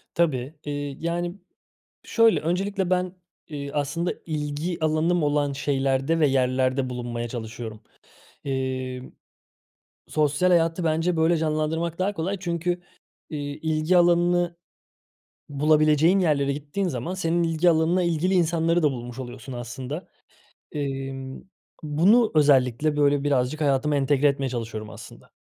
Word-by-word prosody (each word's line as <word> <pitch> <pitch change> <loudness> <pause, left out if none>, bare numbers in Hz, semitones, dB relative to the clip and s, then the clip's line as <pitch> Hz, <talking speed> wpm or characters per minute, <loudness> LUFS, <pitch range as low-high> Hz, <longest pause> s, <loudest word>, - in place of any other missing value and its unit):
Tabii, 145 -4 0
eee, 145 -1 -4
yani, 175 +2 -2 0.7
şöyle, 230 -2 +3
öncelikle 190 +3 -1
ben, 180 0 +1 0.4
eee, 140 -2 -6
aslında, 150 +4 -1
ilgi 155 +3 -3
alanım 160 +2 +2
olan 145 -1 +1
şeylerde 135 +2 0
ve 150 - +5
yerlerde 130 0 +1
bulunmaya 120 -1 -4
çalışıyorum. 110 -2 -7 0.6
Emm, 130 -1 -3 1.0
sosyal 150 +4 +1
hayatı, 165 0 +2
bence, 165 +2 +1
böyle, 165 +1 +3
canlandırmak 160 +2 -1
daha 200 +2 0
kolay 190 +3 -2
çünkü, 175 0 -2 0.5
iii, 145 -1 -5
ilgi 160 +3 +1
alanını 175 0 +3 0.9
bulabileceğin 155 +4 +3
yerlere 140 -5 +2
gittiğin 150 +7 -3
zaman 135 +5 -3
senin 170 -2 0
ilgi 165 +1 +3
alanına 165 +3 +2
ilgili 170 +2 +1
insanları 170 0 +2
da 150 - +4
bulmuş 120 -1 -7
oluyorsun, 125 0 -8
aslında. 125 +7 -6 0.6
Imm, 135 -2 -4 0.4
bunu 185 +10 +4
özellikle, 145 0 +3
böyle, 145 -1 +2
birazcık 140 +1 0
hayatıma 145 0 +2
entegre 140 +1 +2
etmeye 140 -1 -1
çalışıyorum, 110 -3 -5
aslında. - - -12
150 Hz, 120 wpm, -25 LUFS, 135-170 Hz, 1.0 s, ve